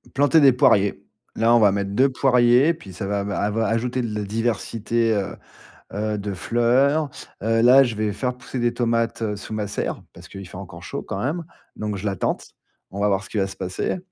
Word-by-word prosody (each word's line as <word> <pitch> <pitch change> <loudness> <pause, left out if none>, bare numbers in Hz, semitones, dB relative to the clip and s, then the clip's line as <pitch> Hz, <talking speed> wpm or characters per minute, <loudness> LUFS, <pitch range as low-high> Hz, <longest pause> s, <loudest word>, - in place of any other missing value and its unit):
Planter 145 +4 +4
des 135 - +7
poiriers. 100 -5 +3 0.3
Là 115 +1 +4
on - - +6
va 105 -2 +5
mettre 100 0 -2
2 130 +7 +3
poiriers, 130 +3 +4
puis 95 - -12
ça 95 +3 -5
va 100 0 -1
va 100 -1 -3
ava 110 +2 0
ajouter 120 +3 -1
de 110 -2 -4
la 105 - -2
diversité, 115 +1 -1
heu 100 -2 -2 0.6
heu, 105 0 -2
de 100 -1 -4
fleurs. 130 - +2 0.3
Heu, 115 +1 +2
là 130 +3 +7
je 120 -3 -2
vais 105 -1 -1
faire 125 +4 -3
pousser 125 +1 -7
des 120 0 0
tomates, 115 -1 0
heu, 105 -2 -1
sous 110 +2 -7
ma 105 -2 -3
serre. - - -3
Parce - - -14
qu'il 95 -1 -9
fait 90 - -11
encore 85 -3 -9
chaud, - - -5
quand 95 - -5
même, 160 +6 -2 0.3
donc 105 -1 -3
je 95 - -7
la 100 -2 -1
tente. - - -3 0.4
On 100 - -6
va 105 - +2
voir 95 0 +1
ce - - -12
qui - - -6
va 95 - +2
se 95 -1 -9
passer 95 - -3
110 Hz, 225 wpm, -22 LUFS, 100-125 Hz, 0.6 s, des